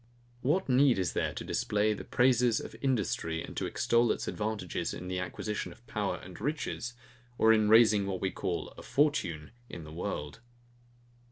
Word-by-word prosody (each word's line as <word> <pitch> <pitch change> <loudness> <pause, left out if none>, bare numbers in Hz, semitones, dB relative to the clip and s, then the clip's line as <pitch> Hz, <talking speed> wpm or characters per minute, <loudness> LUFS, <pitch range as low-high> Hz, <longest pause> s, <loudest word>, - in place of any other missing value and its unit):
What 165 +9 +1
need 130 -1 +4
is 90 -4 0
there - - 0
to - - -4
display 105 +1 +1
the - - -7
praises 125 -2 +3
of - - -8
industry, 95 -10 0
and - - -9
to - - -1
extol 120 -1 +2
its - - -3
advantages, 105 -4 -3
in 90 - -7
the 90 0 -2
acquisition 105 +4 -4
of 120 - -17
power 105 -4 -2
and 90 0 -11
riches, 135 -5 -3 0.4
or 110 0 +6
in 110 -1 +3
raising 110 -3 +6
what 95 -2 -2
we 95 0 -1
call 85 - -3
a - - -8
FORTUNE 135 - 0 0.2
in 85 - -7
the 75 - -10
world? 80 -2 -4
105 Hz, 175 wpm, -30 LUFS, 90-120 Hz, 0.4 s, or